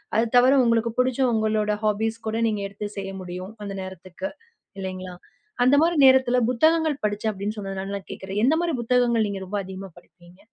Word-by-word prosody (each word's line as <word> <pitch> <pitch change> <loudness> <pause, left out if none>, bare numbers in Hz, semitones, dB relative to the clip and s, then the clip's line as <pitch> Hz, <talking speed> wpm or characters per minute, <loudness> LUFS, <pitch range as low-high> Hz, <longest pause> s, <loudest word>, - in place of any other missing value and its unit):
அது 225 - +3
தவிர, 260 +2 +6
உங்களுக்கு 230 0 +2
பிடிச்ச 255 +1 +1
உங்களோட 215 -1 +1
ஹாபீஸ் 220 +2 0
கூட 220 +1 -1
நீங்க 210 -2 -1
எடுத்து 200 +1 -6
செய்ய 195 0 -4
முடியும், 185 +3 -7
அந்த 200 -1 -5
நேரத்துக்கு 185 - -7 0.5
இல்லைங்களா? 185 -1 -6 0.5
அந்த 255 +3 +5
மாரி 340 +1 +2
நேரத்துல 260 -1 +5
புத்தகங்கள் 315 +3 +2
படிச்சேன் 210 +1 -1
அப்டின்னு 205 +2 -4
சொன்னதுனால 195 -1 -5
நான் 195 - -13
கேட்கிறேன். 195 +2 -4
எந்த 290 +5 +4
மாரி 345 -2 -1
புத்தகங்கள் 235 -2 +2
நீங்க 195 -1 -5
ரொம்ப 205 +2 -3
அதிகமா 190 0 -8
படிப்பீங்க? 175 +1 -19
210 Hz, 170 wpm, -24 LUFS, 195-245 Hz, 0.5 s, தவிர